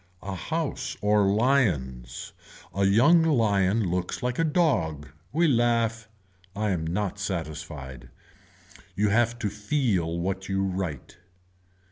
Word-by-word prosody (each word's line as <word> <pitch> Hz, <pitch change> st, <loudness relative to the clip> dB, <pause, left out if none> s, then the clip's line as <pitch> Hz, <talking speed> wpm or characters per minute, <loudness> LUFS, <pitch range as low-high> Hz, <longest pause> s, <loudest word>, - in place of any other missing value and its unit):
A 95 Hz, 0 st, -4 dB
house 160 Hz, -, -3 dB
or 105 Hz, -1 st, +3 dB
lions. 90 Hz, -, 0 dB, 0.4 s
A 100 Hz, +1 st, +1 dB
young 120 Hz, -, +5 dB
lion 110 Hz, -8 st, +2 dB
looks 90 Hz, +4 st, -2 dB
like 125 Hz, +2 st, -1 dB
a -, -, +3 dB
dog. 95 Hz, -, +1 dB, 0.2 s
We 165 Hz, +3 st, +3 dB
laugh. 115 Hz, -4 st, +1 dB, 0.5 s
I 105 Hz, 0 st, 0 dB
am 80 Hz, -3 st, -2 dB
not 105 Hz, +3 st, -2 dB
satisfied. 75 Hz, -9 st, -5 dB, 0.9 s
You 105 Hz, +1 st, +2 dB
have 120 Hz, +3 st, +2 dB
to 105 Hz, -3 st, -2 dB
feel 105 Hz, -, 0 dB
what 95 Hz, +2 st, -3 dB
you 95 Hz, 0 st, 0 dB
write. 90 Hz, -6 st, -4 dB
100 Hz, 120 wpm, -26 LUFS, 85-120 Hz, 0.9 s, young